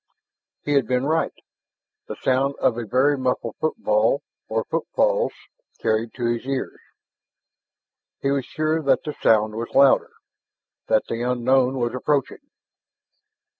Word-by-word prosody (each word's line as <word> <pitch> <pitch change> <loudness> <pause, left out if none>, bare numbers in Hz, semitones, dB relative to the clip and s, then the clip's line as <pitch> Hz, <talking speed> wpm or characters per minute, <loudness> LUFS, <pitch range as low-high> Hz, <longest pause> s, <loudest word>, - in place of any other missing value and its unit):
He 145 - -1
had 140 -2 +2
been 125 +1 0
right! 160 +2 +1 0.8
The - - -5
sound 135 +2 0
of 120 - +1
a 120 -2 -5
very 135 +6 +3
muffled 125 -3 -2
footfall 230 - +1 0.3
or - - 0
footfalls, - - 0 0.5
carried 110 +1 -1
to 120 - -3
his 120 0 -1
ears. 135 0 -4 1.4
He 140 - 0
was 140 -1 0
sure 155 +4 -1
that 140 -3 +2
the 150 - -4
sound 110 -1 +3
was 115 +2 -4
louder, 140 0 +5 0.7
that 110 - +3
the 115 - -3
unknown 125 +2 +2
was 120 -1 -1
approaching. 140 +1 -2
130 Hz, 130 wpm, -23 LUFS, 120-145 Hz, 1.4 s, louder